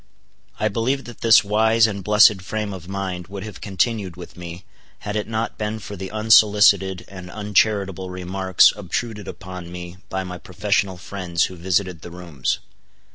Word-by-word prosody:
I 110 - +2
believe 120 +6 -1
that 120 - -11
this 115 -1 +7
wise 110 +2 +4
and 100 -3 -3
blessed 105 -1 +6
frame 105 +2 -3
of 90 -2 -9
mind 95 -2 -4
would 100 0 -7
have 105 -3 -9
continued 100 -1 -1
with 90 -1 -11
me, 85 +1 -9 0.4
had 105 0 -4
it 105 -1 -1
not 115 0 -3
been 105 0 -2
for 105 -1 -8
the 95 0 -6
unsolicited 105 -4 +4
and 95 -2 -10
uncharitable 100 -2 0
remarks 95 +1 +3
obtruded 105 +1 -4
upon 90 -1 -8
me 90 0 -8
by 95 0 -2
my 90 -1 -7
professional 95 +1 -1
friends 90 -3 -2
who 95 - -2
visited 90 -1 -1
the 85 - -9
rooms. 85 -6 -3
95 Hz, 165 wpm, -22 LUFS, 90-105 Hz, 0.4 s, this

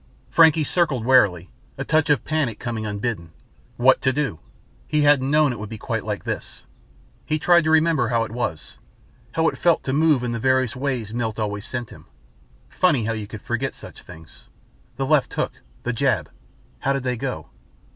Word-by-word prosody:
Frankie 160 -1 +5
circled 150 -7 0
warily, 100 - +3 0.3
a - - -3
touch 155 0 +2
of 145 - +2
panic 150 -9 -1
coming 115 -2 -4
unbidden. 100 -5 -4 0.4
What 130 +2 +4
to 130 - +2
do? 135 - -2 0.5
He 150 -1 +1
hadn't 145 -2 +4
known 150 -1 +4
it 120 - -6
would 105 0 -6
be 110 - -7
quite - - -3
like - - -4
this. - - -6 0.6
He 155 - -1
tried 170 +1 +4
to - - +2
remember 160 -5 +3
how 115 -1 +1
it 110 - -7
was 115 -10 -4 0.5
how 160 0 +2
it - - -2
felt 170 -1 +3
to 130 - -2
move 150 -3 +3
in 120 - -2
the 115 - -3
various 130 0 +1
ways 125 -5 -3
Milt 115 -3 -2
always 105 -2 -3
sent 120 -2 -5
him. - - -14 0.6
Funny 145 -11 +1
how 115 - -1
you 110 -2 -5
could 105 -1 -9
forget 120 +3 -2
such - - -12
things. 80 0 -15 0.5
The 135 +2 -2
left 150 -1 +2
hook - - -3 0.2
that - - -1
jab - - 0 0.5
how 135 - 0
did 140 -2 -2
they 125 -1 -1
go? 115 - -5
130 Hz, 190 wpm, -22 LUFS, 110-150 Hz, 0.6 s, Frankie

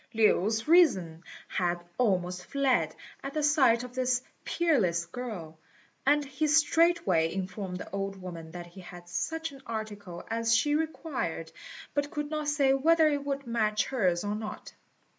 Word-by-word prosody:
Lin's 220 +1 +3
reason 190 - +4 0.2
had 175 -1 -1 0.2
almost 180 -6 +1
fled 275 -2 +1 0.3
at 275 +1 -6
the 305 - 0
sight 265 -6 +4
of 250 0 -8
this 255 0 +1 0.2
peerless 210 - +1
girl, 175 -9 -7 0.5
and 290 0 +4
he 280 +3 -1
straightway 305 - +3
informed 185 0 -4
the - - -9
old 195 0 -3
woman 170 -3 -8
that 175 +1 -8
he 175 +2 -12
had 175 -1 -11
such 325 - -3
an 275 -1 -13
article 205 -5 -6
as 230 0 +2
she 295 +5 +1
required, 295 - -2 0.4
but 285 0 0
could 295 0 -4
not 305 -1 -2
say 285 -2 +3
whether 315 +3 +4
it 285 -1 -1
would 280 -1 -3
match 215 -3 +1
hers 185 -9 +1
or 205 0 -1
not. 215 0 -6
230 Hz, 155 wpm, -29 LUFS, 180-290 Hz, 0.5 s, reason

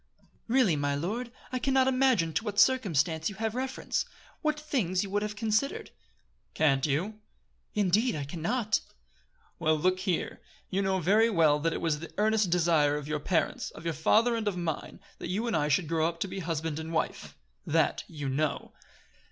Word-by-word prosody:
"Really, 235 -8 +3
my 145 -1 0
lord, 220 - -3 0.2
I 255 - -1
can 270 +2 0
not 260 0 +4
imagine 255 -11 +2
to 230 - 0
what 205 -2 -2
circumstance 165 - +3
you 205 - -9
have 220 +1 -2
reference 260 +2 -2 0.4
what 305 -1 0
things 215 - 0
you 195 - -7
would 205 +1 +1
have 210 0 -3
considered." 220 +5 -1 0.6
"Can't 135 -2 +3
you?" 185 +10 -1 0.6
"Indeed, 210 +4 +2
I 145 - -3
can 155 +4 -7
not." 220 +5 +1 0.8
"Well, 155 -1 +2
look 185 +4 +1
here. 185 -3 -2 0.3
You 195 +1 +1
know 190 -1 +1
very 210 +7 +4
well 160 -7 +4
that 165 +2 0
it - - -4
was 155 -3 0
the 165 - -8
earnest 215 -2 +2
desire 165 -4 +3
of 150 -1 -6
your 150 0 -1
parents, 165 +3 -1
of 165 - -12
your 165 - 0
father 225 +10 +3
and 225 -2 -2
of 195 -3 -1
mine, 165 -3 -4 0.2
that - - -5
you 205 +6 -1
and 230 - 0
I 150 -2 +1
should 155 +3 +1
grow 160 0 +1
up 170 0 -5
to - - 0
be 190 - -5
husband 160 -3 -3
and 160 +1 -6
wife. 165 - -3 0.3
That - - +1
you 145 -3 -6
know." 145 +3 -2
185 Hz, 195 wpm, -29 LUFS, 160-220 Hz, 0.8 s, not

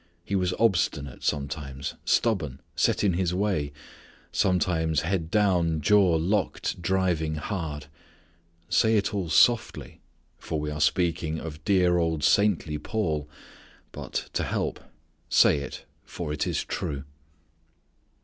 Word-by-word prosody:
He 100 - -2
was 90 -1 +1
obstinate, 90 - 0
sometimes; 70 -1 -3
stubborn; 80 - +1 0.2
set - - +2
in 100 -3 +3
his 90 0 0
way: 95 -8 0 0.6
sometimes 80 -4 +1
head 85 -1 -2
down, 90 -6 +2
jaw 95 +1 +4
locked, 90 +2 -1
driving 85 -4 0
hard. 75 -2 -4 0.8
Say 110 +3 +3
it 100 0 0
all 95 -5 -2
softly, 115 +9 +2 0.4
for 80 - -3
we 75 0 -3
are 75 +1 -4
speaking 85 -3 +1
of 80 -1 -8
dear 90 -3 +3
old 80 -3 0
saintly 80 -3 +2
Paul; 80 -7 -2 0.6
but, - - -5
to - - 0
help, - - -2 0.5
say - - +5
it, 70 - -7 0.2
for 75 - -5
it 75 - -1
is - - -1
true. 70 -2 -4
85 Hz, 125 wpm, -26 LUFS, 75-95 Hz, 0.8 s, say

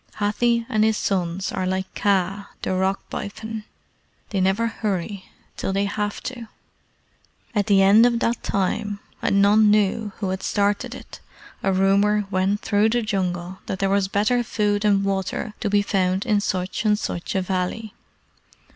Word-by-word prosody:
Hathi 235 +3 +1
and 215 -4 +2
his 220 -1 +2
sons 185 -1 -1
are 185 -1 -2
like 190 0 -2
Kaa, 195 0 0
the - - -1
Rock 190 +1 -1
Python. 220 +1 -6 0.7
They 195 -2 0
never 195 +5 +2
hurry 200 -3 -3 0.3
till - - -2
they 195 +1 +1
have 205 +1 -3
to. 240 -3 -6 1.1
At 205 -1 0
the 195 -2 +5
end 210 +5 +7
of 240 -1 +1
that 235 0 0
time 200 +1 -1 0.2
and 200 0 +3
none 210 +1 +5
knew 210 +1 +2
who 200 -4 -2
had 190 0 -3
started 205 +5 0
it - - -11 0.4
a 195 - +1
rumour 200 +2 +3
went 195 +2 +1
through 210 +1 +2
the 240 +1 +1
Jungle 185 -3 -2
that 190 - -2
there 195 0 0
was 200 -1 +2
better 215 +5 +1
food 210 -2 0
and 200 -2 +3
water 195 +2 -2
to 210 - -1
be 205 0 +3
found 190 0 0
in 210 -4 +2
such 185 +1 -2
and 210 -1 +3
such 175 -4 -4
a 190 - +2
valley. 190 +4 -3
200 Hz, 165 wpm, -23 LUFS, 190-215 Hz, 1.1 s, end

